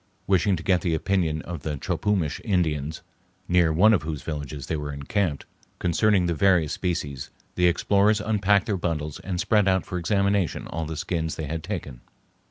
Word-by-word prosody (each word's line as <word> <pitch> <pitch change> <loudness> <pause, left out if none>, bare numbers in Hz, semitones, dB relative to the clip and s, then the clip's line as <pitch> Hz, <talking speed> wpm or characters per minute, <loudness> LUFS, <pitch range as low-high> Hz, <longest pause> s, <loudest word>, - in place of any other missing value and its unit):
Wishing 95 0 +3
to 80 - -7
get 90 -1 +2
the 85 -2 0
opinion 80 -3 0
of 85 -4 -6
the 75 -1 -3
Chopumish 90 0 -1
Indians, 80 -5 -1 0.4
near 90 -2 +3
one 100 +8 +5
of 100 - +2
whose 80 -2 -5
villages 75 -3 -5
they 80 - -2
were 75 -1 -4
encamped, 70 +3 -2 0.3
concerning 90 +2 +2
the 85 - +1
various 85 -3 +3
species, 75 -7 -3 0.2
the 90 0 +3
explorers 100 +4 +3
unpacked 105 -2 +2
their 100 -3 -1
bundles 75 -4 -3
and 90 -2 -4
spread 105 +1 +3
out 95 -1 +2
for 90 - -4
examination 100 -1 0
all 80 +1 -4
the 80 0 -5
skins 80 0 -2
they 80 - -4
had 80 +2 -4
taken. 80 - -6
85 Hz, 180 wpm, -25 LUFS, 75-100 Hz, 0.4 s, one